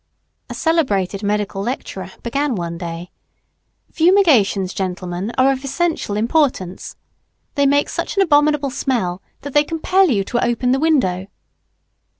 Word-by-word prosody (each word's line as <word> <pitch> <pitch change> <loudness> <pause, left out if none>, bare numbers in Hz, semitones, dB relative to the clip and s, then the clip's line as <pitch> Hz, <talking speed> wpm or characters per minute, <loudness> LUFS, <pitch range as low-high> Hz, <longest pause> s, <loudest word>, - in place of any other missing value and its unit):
A - - -6
celebrated 210 - 0
medical 205 -1 -1
lecturer 200 -4 -5
began 275 +2 -1
one 170 -2 -4
day, 170 0 -6 0.8
"Fumigations, 300 - +3
gentlemen, 185 +1 -3
are 265 +1 +5
of 265 0 -3
essential 295 -7 -1
importance. 230 - 0 0.6
They 280 -1 +2
make 285 +1 +3
such - - -4
an 395 - +5
abominable 295 -3 +2
smell 195 -10 -1 0.2
that 285 -1 -7
they 295 - +5
compel 345 +4 +2
you 205 -7 +1
to 240 +4 -1
open 245 +1 +1
the 265 - +2
window." 225 - +1
250 Hz, 135 wpm, -19 LUFS, 195-295 Hz, 0.8 s, are